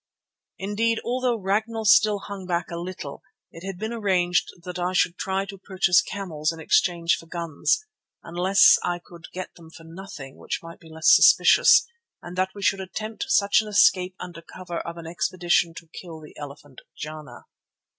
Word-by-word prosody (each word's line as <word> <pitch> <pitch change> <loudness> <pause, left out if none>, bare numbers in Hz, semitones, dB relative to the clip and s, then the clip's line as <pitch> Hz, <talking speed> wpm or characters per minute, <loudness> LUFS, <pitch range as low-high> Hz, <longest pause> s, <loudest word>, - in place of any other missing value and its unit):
Indeed, 225 +3 0
although 250 0 0
Ragnall 220 +3 -2
still 215 -2 +5
hung 195 -2 -8
back 175 -1 -2
a 170 - -4
little, 170 -5 -7 0.3
it 165 - -12
had 195 -1 -6
been 220 +4 -4
arranged 185 -5 +1 0.2
that 180 0 -6
I 180 +1 -1
should 180 -2 +2
try 190 +1 -2
to 195 -1 -10
purchase 185 -2 +2
camels 165 -6 -3
in 165 - -10
exchange 170 0 +2
for 165 - -13
guns, 170 - -1 0.4
unless 190 +3 +5
I 175 0 -1
could 170 -1 -14
get 185 0 -7
them 165 -2 -16
for 165 - -14
nothing 165 -5 -10
which - - -5
might 165 0 -11
be 165 - -16
less 160 0 +5
suspicious, - - +6 0.3
and 175 +1 -10
that 185 +1 -1
we 200 - -8
should 195 0 +2
attempt 215 +4 -5
such 215 -4 +3
an 215 - -9
escape 185 -3 +3
under 175 -2 -8
cover 175 0 -7
of 170 0 -7
an 165 - -9
expedition 175 0 0
to 165 - -11
kill 165 -3 -9
the 150 - -14
elephant 145 -2 -11 0.2
Jana. 155 0 -8
180 Hz, 175 wpm, -24 LUFS, 165-200 Hz, 0.4 s, suspicious